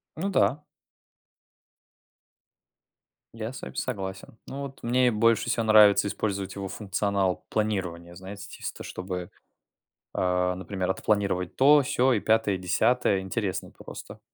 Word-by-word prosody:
Ну 190 +6 -2
да. 150 -5 +2 2.7
Я 115 +2 -5
с - - -9
вами - - -8
согласен, 95 -2 -5
ну 140 +1 -6
вот 135 -1 -9
мне 125 +1 +2
и - - +6
больше 115 +1 +2
всего 115 - +1
нравится 105 -2 +6
использовать 100 -2 -3
его 100 -1 -4
функционал 100 -1 -1
планирования, 90 -5 -2
знаете, 100 +2 -9
тес - - -6
то, - - -9
чтобы, 90 -1 -5 0.9
э, 90 0 +1
например, 95 0 -2
отпланировать 100 -4 -1
то, 145 +2 +6
сё 130 0 +2
и 105 - +1
пятое, 110 -3 +2
десятое, 100 +2 +2
интересно 95 -1 -3
просто. - - -10
100 Hz, 130 wpm, -27 LUFS, 95-115 Hz, 2.7 s, и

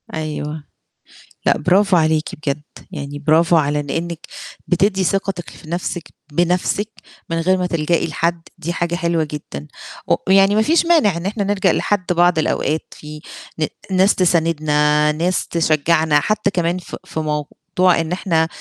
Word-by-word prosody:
أيوه. 155 -1 -4 0.8
لأ، - - +3
برافو 185 +3 +3
عليكِ 155 -1 +1
بجد، 145 -1 -3 0.3
يعني 145 +1 -6
برافو 160 +3 +3
على 150 -2 +2
إن 145 -1 -5
إنِّك 170 +1 -3 0.5
بتدّي 190 +2 +2
ثقتِك 190 -1 -1
في 155 - -14
نَفْسِك 175 0 -3 0.3
بنَفْسِك 180 +5 +1 0.4
من 165 0 -1
غير 185 +3 +2
ما 180 -1 -1
تلجئي 170 -1 0
لحد، 170 +2 -1 0.2
دي 170 +3 -4
حاجة 175 0 -1
حلوة 170 -2 0
جدًا 145 - -7 0.4
و - - +4 0.2
يعني 195 +1 +5
ما 215 - +4
فيش 325 +8 +3
مانع 300 - +3
إن 170 - -6
إحنا 205 +1 -1
نلجأ 195 -2 +2
لحد 205 -3 0
بعض 175 -1 +3
الأوقات 155 0 -1
في 150 0 -10 0.4
ن 155 - +2 0.3
ناس 190 +2 +4
تساندنا، 150 -4 +2
ناس 170 +4 -1
تشجّعنا، 160 -1 +2
حتى 210 +4 0
كمان 175 -1 0
ف 180 - -8
في - - -5
موضوع 150 -1 -3 0.5
إن 165 0 -5
إحنا 170 -3 +1
170 Hz, 155 wpm, -19 LUFS, 155-185 Hz, 0.8 s, يعني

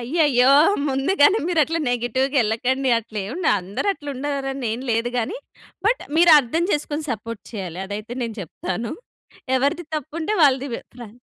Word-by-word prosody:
అయ్యయ్యో! 265 -1 +3 0.4
ముందుగానే 290 +8 +3
మీరు 335 -3 +2
అట్లా 330 +3 -2
నెగెటివ్‌గా 260 +4 0
ఎళ్ళకండి. 255 +4 0
అట్లా 220 -1 -7
ఎం - - -6
ఉండ 350 -2 -3
అందరు 195 - -3
అట్లా 290 -6 -11
ఉండాలని 270 -1 -3
ఏం 235 - -4
లేదుగాని, 240 - -1 0.5
బట్ - - +2
మీరు 340 0 +7
అర్థం 295 +6 0
చేసుకొని 295 +1 -2
సపోర్ట్ 230 0 -5
చేయాలి. 185 -4 -5
అదైతే 210 +4 -6
నేను 230 -2 -4
చెప్తాను. 185 +6 -5 0.6
ఎవరిది 285 +6 0
తప్పుంటే 315 +6 -4
వాళ్ళది. 270 -1 +3 0.3
ప్రాం 235 -4 -10
260 Hz, 145 wpm, -22 LUFS, 230-295 Hz, 0.6 s, మీరు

